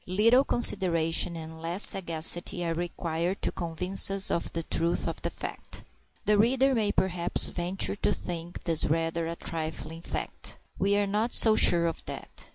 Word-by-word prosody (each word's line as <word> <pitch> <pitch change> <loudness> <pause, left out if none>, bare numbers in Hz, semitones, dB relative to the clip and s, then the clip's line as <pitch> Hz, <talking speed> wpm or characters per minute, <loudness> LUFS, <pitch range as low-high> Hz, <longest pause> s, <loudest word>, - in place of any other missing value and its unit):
Little 225 +8 +3
consideration 170 -9 +2
and 160 0 -10
less 170 +5 0
sagacity 175 +1 +2
are 165 - -2
required 170 +1 -4
to - - -1
convince 180 +3 +3
us 195 0 +6
of 170 - -3
the 165 - -4
truth 165 +1 -1
of - - -6
that - - -4
fact. - - -8 0.4
The 210 0 +2
reader 265 +4 +2
may 215 -4 0
perhaps 180 -3 +1
venture 180 +2 -2
to 205 - -2
think 170 0 -7
this 165 -2 -1
rather 165 +1 -2
a 165 - -5
trifling 160 0 -7
fact. - - -7 0.2
We 200 +2 +1
are 205 - +1
not 210 +4 -2
so 220 -1 +6
sure 170 -4 +5
of 165 - -4
that. - - -10
175 Hz, 165 wpm, -26 LUFS, 165-200 Hz, 0.4 s, us